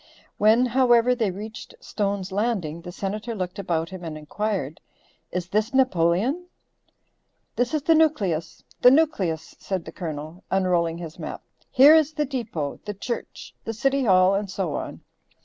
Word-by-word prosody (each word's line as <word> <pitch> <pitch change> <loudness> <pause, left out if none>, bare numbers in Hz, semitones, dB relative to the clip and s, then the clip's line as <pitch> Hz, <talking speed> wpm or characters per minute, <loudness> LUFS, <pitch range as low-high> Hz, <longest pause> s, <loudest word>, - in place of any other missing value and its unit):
When, 220 +4 +5
however, 250 -1 +4
they 230 -5 0
reached 210 +3 -8
Stone's 200 -2 -3
Landing 190 -6 -1
the 175 +1 -8
Senator 210 +5 -4
looked 185 -1 -4
about 165 -4 -1
him 185 -1 -8
and 160 -2 -5
inquired, 160 -1 -3 0.5
"Is 180 -1 -3
this 215 +6 0
Napoleon?" 255 - +2 1.1
"This 245 +4 0
is 300 - -1
the 330 - +4
nucleus, 195 - +1 0.2
the 250 - +9
nucleus," 205 - +1
said 190 -4 -3
the 160 - -8
Colonel, 160 0 -7
unrolling 175 -3 +1
his 165 -2 -8
map. - - -6 0.3
"Here 280 +3 +8
is 315 -1 +4
the 300 -1 0
deepo, 230 - -4
the 210 -1 -5
church, 235 +5 -6
the 225 - -4
City 270 +4 +1
Hall 185 -2 +5
and 200 0 -1
so 185 -5 -2
on." - - -5
200 Hz, 155 wpm, -24 LUFS, 175-245 Hz, 1.1 s, the